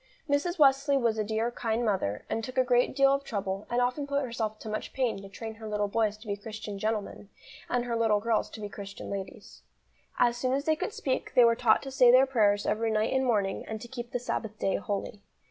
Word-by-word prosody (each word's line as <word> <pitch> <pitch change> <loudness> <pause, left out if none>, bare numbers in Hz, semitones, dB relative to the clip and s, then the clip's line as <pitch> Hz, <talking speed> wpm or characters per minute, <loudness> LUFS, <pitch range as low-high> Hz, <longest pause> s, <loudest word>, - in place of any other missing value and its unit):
Mrs. 300 +5 0
Wesley 275 -1 +4
was 230 -4 +1
a - - +2
dear, 220 +2 -1
kind 235 0 -1
mother, 185 - -1
and 225 - -2
took 255 +3 -7
a 255 - +5
great 245 0 +2
deal 275 0 +5
of 275 0 -1
trouble, 195 -4 -4
and 240 - +1
often 250 +4 0
put 280 0 0
herself 225 -3 -3
to 220 - -10
much 215 0 -4
pain 245 -7 -1
to 195 - -10
train 225 +2 -7
her 220 0 -9
little 210 -1 0
boys 215 0 0
to 215 - -15
be 200 -2 -2
Christian 210 -1 -7
gentlemen, 210 -1 -3 0.4
and 245 -1 0
her 235 -1 -2
little 225 -2 +3
girls 225 +1 0
to - - -10
be 205 - -4
Christian 200 -1 -8
ladies. 200 +2 -7 0.6
As 240 0 +3
soon 255 +1 0
as 280 +2 -1
they 315 - +3
could 370 +6 -3
speak, 265 -9 -3
they 245 - +8
were 230 - +5
taught 230 -2 +3
to 270 - -6
say 255 -2 +5
their 255 +2 +7
prayers 210 -6 +2
every 225 +1 0
night 215 +2 +1
and 265 0 +2
morning, 205 -6 0
and 220 0 -4
to 240 - -9
keep 240 -1 -7
the - - 0
Sabbath 220 -3 -4
day 195 - 0
holy. 200 +1 -4
230 Hz, 240 wpm, -29 LUFS, 210-255 Hz, 0.6 s, they